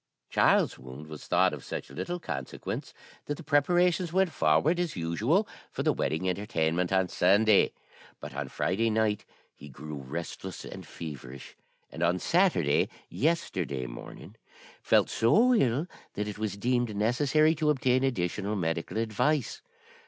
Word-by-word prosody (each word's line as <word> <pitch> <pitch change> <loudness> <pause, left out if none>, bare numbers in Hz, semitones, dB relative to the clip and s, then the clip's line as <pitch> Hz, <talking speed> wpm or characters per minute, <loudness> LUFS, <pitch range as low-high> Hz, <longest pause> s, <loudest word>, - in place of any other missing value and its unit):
"Charles's - - +3
wound 65 +4 -10
was 75 -1 -10
thought - - +3
of - - -7
such - - -6
little 175 - -4
consequence 70 - -5 0.4
that 145 - -1
the - - -10
preparations 175 +4 +2
went 190 -1 +2
forward, 130 - +2
as 175 -3 -1
usual, 110 - +1 0.2
for - - -4
the - - +3
wedding 85 +4 -1
entertainment 90 -3 0
on 95 -1 +3
Sunday. 100 +4 +4 0.5
But - - -8
on - - -4
Friday 115 +5 0
night 110 -1 0 0.3
he 75 - -13
grew 75 +3 -9
restless 85 +6 -6
and - - -9
feverish, 70 -5 -9 0.4
and 80 - -8
on 85 +1 +3
Saturday 165 - +2 0.2
(yesterday) 90 - -1
morning - - -10 0.4
felt - - +3
so 225 - +4
ill 135 - +2 0.3
that 105 +1 -2
it 105 0 -6
was 110 -2 -2
deemed 120 0 0
necessary 140 +8 +3
to 155 -1 0
obtain 130 -3 +2
additional 100 -4 -1
medical 85 +1 -2
advice. 115 +5 0
105 Hz, 145 wpm, -29 LUFS, -, 0.5 s, Sunday